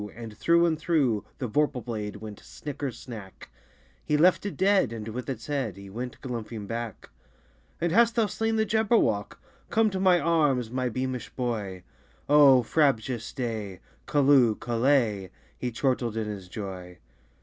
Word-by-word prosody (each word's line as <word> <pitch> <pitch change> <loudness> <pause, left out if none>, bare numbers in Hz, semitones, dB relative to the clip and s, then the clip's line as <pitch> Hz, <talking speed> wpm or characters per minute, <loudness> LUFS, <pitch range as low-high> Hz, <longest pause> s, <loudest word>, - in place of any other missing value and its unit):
And 115 -2 -8
through 170 +9 +4
and 160 -2 0
through 140 - +1
The 130 - -3
vorpal 145 +1 0
blade 105 -4 -4
went 105 0 -9
snicker 145 -2 -6
snack! 110 -5 -10 0.5
He 150 - +1
left 180 +5 +4
it 200 - -6
dead, 195 - +3
and 110 -2 -6
with 125 +4 -5
its 120 -4 -5
head 135 -10 -2
He 100 0 -11
went 125 +4 -6
galumphing 115 -4 -5
back. 115 0 -6 0.7
"And 170 0 0
hast 230 +4 +4
thou 230 -2 +3
slain 225 +2 -1
the 220 0 +2
Jabberwock? 215 - +1 0.3
Come 220 -1 +3
to 190 - -2
my 185 -2 +5
arms, 145 -7 +1
my 130 0 -1
beamish 130 +1 -3
boy! 105 -7 -3 0.4
O 140 -3 +7
frabjous 125 -4 +1
day! 110 -7 -4 0.3
Callooh! 135 -6 +4
Callay!" 115 -5 +1 0.3
He 125 - -3
chortled 120 -2 -1
in 110 - -1
his 100 -3 -6
joy. 90 -3 -7
125 Hz, 155 wpm, -27 LUFS, 110-150 Hz, 0.7 s, O